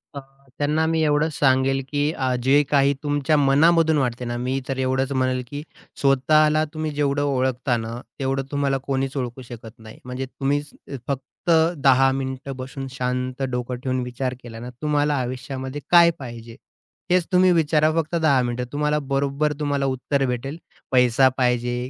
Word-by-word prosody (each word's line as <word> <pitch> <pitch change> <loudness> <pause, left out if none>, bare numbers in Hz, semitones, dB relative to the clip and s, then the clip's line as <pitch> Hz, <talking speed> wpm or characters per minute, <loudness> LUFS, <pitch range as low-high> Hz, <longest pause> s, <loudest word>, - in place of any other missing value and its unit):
अ, - - -4 0.4
त्यांना 150 +2 +1
मी 160 0 +1
एवढंच 150 +1 +1
सांगेल 135 0 +3
की 145 +1 0
आज 130 -3 -1
जे 140 +3 +5
काही 140 -1 +3
तुमच्या 145 +1 +1
मनामधून 160 +3 +4
वाटते 125 -2 -1
ना, 120 0 -3
मी 130 +2 -1
तर 135 - -3
एवढंच 130 +1 0
म्हणेल 130 -1 0
की 145 +3 -6 0.4
स्वतःला 150 +3 +3
तुम्ही 155 0 -3
जेवढं 145 -1 0
ओळखता 130 -2 0
ना, 115 +1 -5 0.2
तेवढं 135 0 -1
तुम्हाला 140 -1 0
कोणीच 135 0 -3
ओळखू 125 0 -4
शकत 120 -1 -11
नाही. 110 -1 -13
म्हणजे 125 +1 -4
तुम्हीच 145 +2 -2 0.4
फक्त 140 +5 -5 0.3
10 135 -1 +5
मिनिटं 130 0 -4
बसून 135 +1 -7
शांत 125 0 -3
डोकं 125 0 -3
ठेवून 130 -1 -1
विचार 125 +1 -3
केला 115 -1 -9
ना, 120 - -7
तुम्हाला 150 -1 +1
आयुष्यामध्ये 130 +2 -5
काय 170 -1 +7
पाहिजे, 115 -3 -9 0.6
हेच 180 -2 +3
तुम्ही 185 0 +5
विचारा 155 -2 +3
फक्त 160 +2 -3
10 155 -6 +3
मिनिटं. 120 0 -2
तुम्हाला 150 +1 0
बरोबर 140 +2 0
तुम्हाला 145 -2 0
उत्तर 135 +1 0
भेटेल, 130 +4 -3 0.3
पैसा 125 0 +4
पाहिजे 125 0 0
135 Hz, 160 wpm, -23 LUFS, 125-145 Hz, 0.6 s, काय